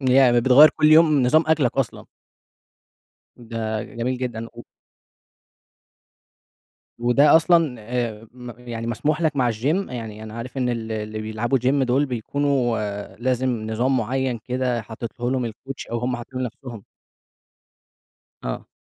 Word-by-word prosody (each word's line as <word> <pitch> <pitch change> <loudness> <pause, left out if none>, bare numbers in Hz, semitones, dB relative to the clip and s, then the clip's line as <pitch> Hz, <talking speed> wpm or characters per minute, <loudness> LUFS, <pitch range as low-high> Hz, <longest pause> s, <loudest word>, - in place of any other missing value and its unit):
يعني 130 -2 +4
ب - - -5
بتغيّر 135 +4 +8
كل 155 - +3
يوم 155 -3 +5
نظام 155 +6 +4
أكلك 150 -6 +1
أصلًا. 130 -7 -2 1.3
ده 110 -2 -4
جميل 125 +2 -3
جدًا. 115 -3 -4
و 120 - -10 2.4
وده 120 +6 +5
أصلًا، 165 -5 +3
آآ، 115 -1 -4
م 125 -1 -9
يعني 115 -2 -6
مسموح 150 +7 -1
لَك 155 -3 0
مع 125 -3 +2
الGym؟ 110 +1 -7 0.3
يعني 110 -3 -7
أنا 110 0 -9
عارف 120 +3 -7
إن 125 -1 0
ال 115 -2 -3
اللي 110 0 -4
بيلعبوا 110 +4 -1
Gym 130 +3 +1
دول 130 +3 +2
بيكونوا 130 0 0 0.4
لازم 130 +2 0 0.2
نظام 125 +4 +1
معيّن 125 +1 -1
كده 125 -2 -1
حاططه 115 +2 -5
لهم 125 -3 -1
الCoach 135 +4 -9
أو 120 - -1
هم 125 +1 -2
حاطينه 130 +2 -7
لنفسهم. 120 -3 -7 1.6
آه. - - -5
125 Hz, 135 wpm, -22 LUFS, 115-130 Hz, 2.4 s, بتغيّر